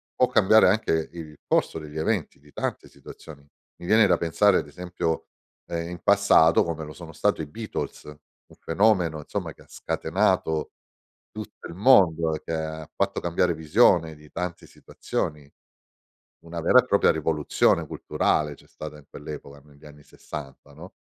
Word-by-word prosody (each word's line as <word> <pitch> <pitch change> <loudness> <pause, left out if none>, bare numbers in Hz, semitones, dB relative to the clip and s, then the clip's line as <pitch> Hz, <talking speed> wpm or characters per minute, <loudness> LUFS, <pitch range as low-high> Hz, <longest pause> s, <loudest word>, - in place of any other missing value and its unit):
può - - +3
cambiare 110 0 +5
anche 85 -6 +1
il 80 -3 -9
corso - - +1
degli 75 0 -9
eventi 85 +1 -1
di 75 +1 -21
tante - - -4
situazioni. 70 -3 -13 0.3
Mi - - -11
viene 110 +2 +5
da 90 -2 +3
pensare, 90 +4 +3
ad - - -3
esempio, 85 +1 -4 0.4
ehm, 85 0 -4
in 90 0 -7
passato 100 -5 +5
come 80 -2 -4
lo 75 - -10
sono 85 -1 -11
stato 80 +4 0
i 75 - -5
Beatles, 110 +8 -6
un 75 -2 -17
fenomeno, 90 -3 +2
insomma, 75 - -5
che - - -19
ha - - -26
scatenato 95 -3 -1 0.6
tutto - - -9
il - - -9
mondo, 90 -7 +4
che - - -5
ha 80 -1 -4
fatto 100 0 -1
cambiare 85 0 0
visione 80 0 +3
di 75 0 -18
tante 90 -1 -5
situazioni. 75 -2 -5 0.9
Una 85 0 -6
vera 85 - +6
e - - -10
propria - - +3
rivoluzione 80 -1 +1
culturale 75 -1 -1
c'è - - -20
stata 75 -1 -9
in 75 - -18
quell'epoca 70 -1 -9
negli 75 0 -18
anni 75 0 -14
60, 70 -1 -10
no? 85 +5 -11
80 Hz, 160 wpm, -25 LUFS, 75-90 Hz, 0.9 s, vera